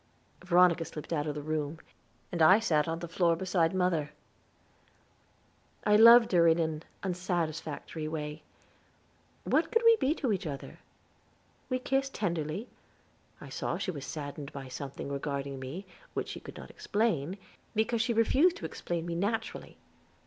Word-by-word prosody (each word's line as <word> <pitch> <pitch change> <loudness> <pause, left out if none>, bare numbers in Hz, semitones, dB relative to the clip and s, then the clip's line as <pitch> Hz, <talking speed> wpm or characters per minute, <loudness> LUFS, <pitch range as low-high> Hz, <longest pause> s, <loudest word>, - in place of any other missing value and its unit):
Veronica 180 -2 +4
slipped 155 0 -7
out 150 -1 -1
of 150 - -2
the 150 - -5
room; 155 0 -2 0.5
and 170 - -2
I 185 +5 +8
sat 160 -8 +1
on 165 0 -1
the 170 +1 -6
floor 170 0 +2
beside 175 -2 +1
mother. 165 -5 0 1.7
I 210 - +4
loved 230 +2 +8
her 170 -2 +5
in 165 0 +5
an 160 -2 -1 0.2
unsatisfactory 165 -4 -3
way. 150 -1 -5 1.0
What - - +1
could 465 -1 +2
we 460 -1 +8
be 295 -4 +1
to 255 -10 0
each 190 -3 -3
other? 140 -2 -7 0.9
We 255 - +1
kissed 270 +1 -1
tenderly; 170 +2 -2 0.7
I - - -10
saw - - -2
she 185 - -2
was 145 -5 -7
saddened 145 -1 -6
by 135 -2 -8
something 140 +2 -6
regarding 140 -1 -3
me, 140 +10 -6 0.3
which - - -2
she - - -6
could - - -11
not - - -10
explain, 190 -6 -1 0.4
because 220 +1 +1
she 235 - +1
refused 270 +10 +4
to - - -7
explain 170 -1 -4
me 170 - -3
naturally. 220 +6 -3
170 Hz, 155 wpm, -30 LUFS, 150-210 Hz, 1.7 s, I